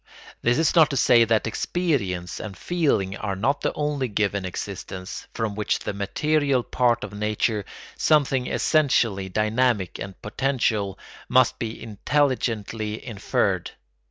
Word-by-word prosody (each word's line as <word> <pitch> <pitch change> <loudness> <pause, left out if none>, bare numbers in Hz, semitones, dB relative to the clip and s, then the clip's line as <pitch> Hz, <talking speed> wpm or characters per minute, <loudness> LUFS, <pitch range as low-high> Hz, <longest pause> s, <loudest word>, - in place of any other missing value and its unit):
This 120 +1 +2
is 160 - +3
not 160 -4 +6
to 140 - -2
say 120 -2 +5
that 115 -1 +2
experience 110 - -1
and 100 -4 -7
feeling 140 - 0
are 100 -1 -3
not 140 +9 0
the - - 0
only 150 -3 -1
given 100 -2 -1
existence, 95 0 -6
from 110 -2 -2
which 105 +1 0
the - - -4
material 140 +6 +1
part 120 -1 +1
of 100 - -7
nature, 105 0 -1 0.3
something 140 -4 +3
essentially 115 - +2
dynamic 110 -1 +1
and 95 0 -7
potential, 110 -4 -1 0.3
must 130 -1 +4
be 115 -1 -4
intelligently 110 -3 -1
inferred. 110 -6 -1
115 Hz, 130 wpm, -24 LUFS, 100-135 Hz, 0.3 s, not